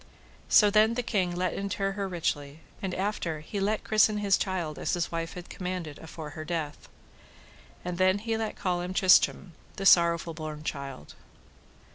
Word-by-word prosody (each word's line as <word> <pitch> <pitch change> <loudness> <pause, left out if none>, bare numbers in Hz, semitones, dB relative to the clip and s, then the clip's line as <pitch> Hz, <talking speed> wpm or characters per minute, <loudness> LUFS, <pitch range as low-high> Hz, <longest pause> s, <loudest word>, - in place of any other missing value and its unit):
So 210 -2 +6
then 215 +2 +4
the 245 - -1
king 185 -6 0
let 180 0 -1
inter 195 0 -2
her 195 0 -3
richly, 155 -4 -3 0.2
and 190 -2 -3
after 180 -6 -2
he 200 +6 -5
let 210 +2 0
christen 215 0 +3
his 200 -2 +3
child 175 -6 -2
as - - 0
his 175 -1 -2
wife 165 0 -4
had 180 0 -8
commanded 180 -5 -5
afore 160 -2 -8
her 155 +1 -7
death. 155 -3 -4 1.0
And 180 0 -4
then 185 +1 +4
he 225 +2 -2
let 220 -1 -3
call 180 -2 -1
him 180 +1 -5
Tristram, 185 -1 +4 0.2
the 195 - -5
sorrowful 170 -2 +5
born 155 -1 -6
child. 140 - -6
180 Hz, 170 wpm, -28 LUFS, 160-200 Hz, 1.0 s, So